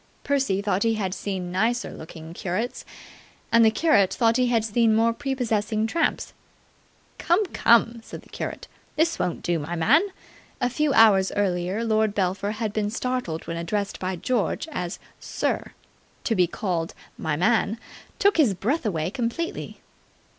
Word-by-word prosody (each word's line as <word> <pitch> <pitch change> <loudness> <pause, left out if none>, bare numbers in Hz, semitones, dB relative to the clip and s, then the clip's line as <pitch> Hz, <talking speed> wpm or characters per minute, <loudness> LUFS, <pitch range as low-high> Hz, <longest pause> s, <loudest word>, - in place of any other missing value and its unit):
Percy 265 -9 0
thought 200 -2 0
he 225 0 +2
had 190 -4 -2
seen 185 -2 -4
nicer 225 +6 0
looking 160 0 -10
curates, 190 +8 -3 0.7
and 230 0 +6
the 220 - +7
curate 220 - +3
thought 230 -1 +2
he 250 -1 +2
had 230 -2 +1
seen 225 0 +3
more 230 +1 +3
prepossessing 230 -5 -1
tramps. 330 +9 -1 0.9
"Come, 360 +5 +2
come!" 230 0 +4
said - - -10
the - - -20
curate. - - -6 0.3
"This 330 +2 +1
won't 175 - -2
do, 170 -1 0
my 160 +4 -4
man!" 225 - +4 0.6
A 250 -2 0
few 300 +2 +1
hours 200 -4 +6
earlier 190 +1 0
Lord 220 -2 +1
Belpher 195 +2 0
had 220 -1 -3
been 210 -1 0
startled 245 -8 -3
when 165 - -4
addressed 200 +4 -2
by 185 0 -2
George 225 - -1
as 180 - -4 0.2
"sir". - - -2 0.5
To 230 - +1
be 180 -3 +3
called 170 -3 -3 0.2
"my 155 -1 -2
man" 215 +5 +2 0.4
took 405 -2 +3
his 255 -12 +4
breath 250 - -1
away 165 -3 -1
completely. 250 +8 -4
215 Hz, 155 wpm, -25 LUFS, 185-240 Hz, 0.9 s, the